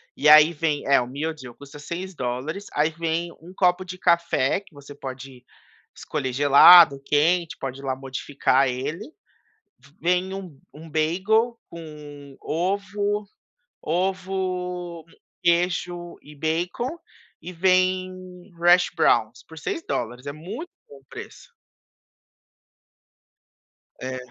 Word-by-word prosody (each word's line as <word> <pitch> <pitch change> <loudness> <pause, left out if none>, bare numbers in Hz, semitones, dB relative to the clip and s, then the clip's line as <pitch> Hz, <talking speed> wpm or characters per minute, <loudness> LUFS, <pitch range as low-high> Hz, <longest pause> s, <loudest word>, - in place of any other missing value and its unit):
e 150 - +3
aí 155 +2 +8
vem, 150 -2 -1
é 135 -2 +4
o 120 - -4
meal 150 +5 -3
deal 125 -6 -12
custa 140 +1 -13
$6, 160 0 -5
aí 155 +2 +1
vem 170 +1 -2
um 175 +2 -13
copo 180 0 +2
de 185 +1 -8
café, 170 -4 +2
que 190 -5 -23
você 145 0 -12
pode 130 -1 -9 0.5
escolher 135 -4 -4
gelado, 140 +1 +8
quente, 165 +3 +1
pode 135 0 -5
ir - - -14
lá 130 -1 -1
modificar 135 0 0
ele. 150 - -4 0.9
Vem 180 +2 0
um 180 -8 -8
um 160 +2 -12
bagel 195 +10 +1
com 150 -4 -11
ovo 200 +4 -2 0.5
ovo, 180 -1 -3 0.4
queijo 175 0 0
e 150 0 -15
bacon, 175 - -2 0.4
e 180 - -8
vem 185 +1 0
hash 175 +1 +5
browns 115 +1 +2
por 160 - -13
$6, 125 - -4
é - - -2
muito 210 - -8 0.2
bom 140 - -14
o 135 - -30
preço. - - -11 2.5
É. 130 0 -4
165 Hz, 120 wpm, -24 LUFS, 140-185 Hz, 2.5 s, aí